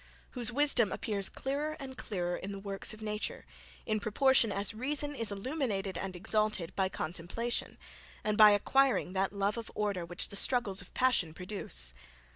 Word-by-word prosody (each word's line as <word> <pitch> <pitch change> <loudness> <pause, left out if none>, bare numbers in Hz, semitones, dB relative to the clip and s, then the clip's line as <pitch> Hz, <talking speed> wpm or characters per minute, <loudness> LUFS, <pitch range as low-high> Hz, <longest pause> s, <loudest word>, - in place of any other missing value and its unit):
whose 245 -2 0
wisdom 255 -5 +4
appears 200 -3 -2
clearer 295 +3 -3
and 265 -2 -7
clearer 175 -7 -3
in 195 - -6
the 200 - -6
works 195 0 -4
of 215 0 -10
nature, 210 0 -4 0.4
in 215 -1 0
proportion 230 +2 +4
as 200 +2 -2
reason 290 +5 0
is 230 -6 0
illuminated 200 -4 -2
and 190 -1 -4
exalted 210 -1 0
by 190 -1 +1
contemplation, 180 +8 -3 0.5
and 210 0 0
by 215 0 +9
acquiring 240 0 +2
that 195 0 0
love 200 +2 -1
of 230 - -8
order 205 -4 -1
which 175 +1 -1
the - - -9
struggles 200 -3 +2
of 180 - -13
passion 230 -11 +2
produce? 165 - +1
210 Hz, 165 wpm, -31 LUFS, 195-245 Hz, 0.5 s, by